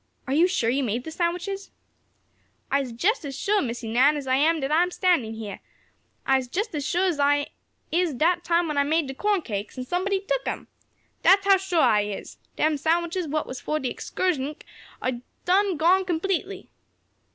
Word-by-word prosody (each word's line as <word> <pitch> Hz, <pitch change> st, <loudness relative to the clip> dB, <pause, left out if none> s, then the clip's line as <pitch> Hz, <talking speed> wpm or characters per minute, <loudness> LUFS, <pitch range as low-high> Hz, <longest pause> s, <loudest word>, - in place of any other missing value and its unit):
Are 265 Hz, -, -2 dB
you 330 Hz, +5 st, +5 dB
sure 255 Hz, -11 st, +1 dB
you 275 Hz, +2 st, 0 dB
made 240 Hz, +1 st, -2 dB
the 320 Hz, -, -7 dB
sandwiches?" 360 Hz, +4 st, -2 dB, 1.0 s
"I'se 275 Hz, -3 st, 0 dB
jest 360 Hz, -, 0 dB
as 275 Hz, -3 st, -6 dB
shuah, 415 Hz, +1 st, +1 dB
Missie 235 Hz, -2 st, -4 dB
Nan, 275 Hz, +6 st, +4 dB
as 285 Hz, -, -5 dB
I 260 Hz, -, 0 dB
am 315 Hz, +4 st, +3 dB
dat 270 Hz, 0 st, -2 dB
I'se 350 Hz, +3 st, +2 dB
standin' 295 Hz, -12 st, +2 dB
heah. 215 Hz, -3 st, -7 dB, 0.7 s
I'se 265 Hz, -1 st, +2 dB
jest 405 Hz, -, -3 dB
as 295 Hz, -2 st, -2 dB
shuah 360 Hz, +6 st, +1 dB
as 335 Hz, -5 st, -1 dB
I 285 Hz, 0 st, +2 dB, 0.4 s
is 340 Hz, -3 st, +1 dB
dat 340 Hz, +7 st, +2 dB
time 340 Hz, 0 st, +2 dB
when 300 Hz, -2 st, 0 dB
I -, -, +4 dB
made 315 Hz, +2 st, +1 dB
de 270 Hz, -, -5 dB
corn 405 Hz, +4 st, 0 dB
cakes, 210 Hz, 0 st, -5 dB
an' 255 Hz, -, -4 dB
somebody 375 Hz, +6 st, 0 dB
tuck -, -, -1 dB
dem! -, -, -4 dB, 0.5 s
Dat's 390 Hz, +1 st, +5 dB
how 395 Hz, -1 st, +6 dB
shuah 370 Hz, -3 st, 0 dB
I 210 Hz, -1 st, +4 dB
is! 205 Hz, -1 st, -7 dB, 0.2 s
Dem 310 Hz, -1 st, +1 dB
sandwiches 340 Hz, +3 st, 0 dB
what 305 Hz, +1 st, -1 dB
was 260 Hz, -, -7 dB
fo' 305 Hz, -, -1 dB
de 260 Hz, -4 st, -3 dB
excursnick 300 Hz, -5 st, -2 dB, 0.4 s
am 250 Hz, -2 st, -2 dB, 0.2 s
done 380 Hz, 0 st, +2 dB
gone 355 Hz, +5 st, +4 dB
completely." 365 Hz, +1 st, -2 dB
315 Hz, 190 wpm, -25 LUFS, 265-365 Hz, 1.0 s, how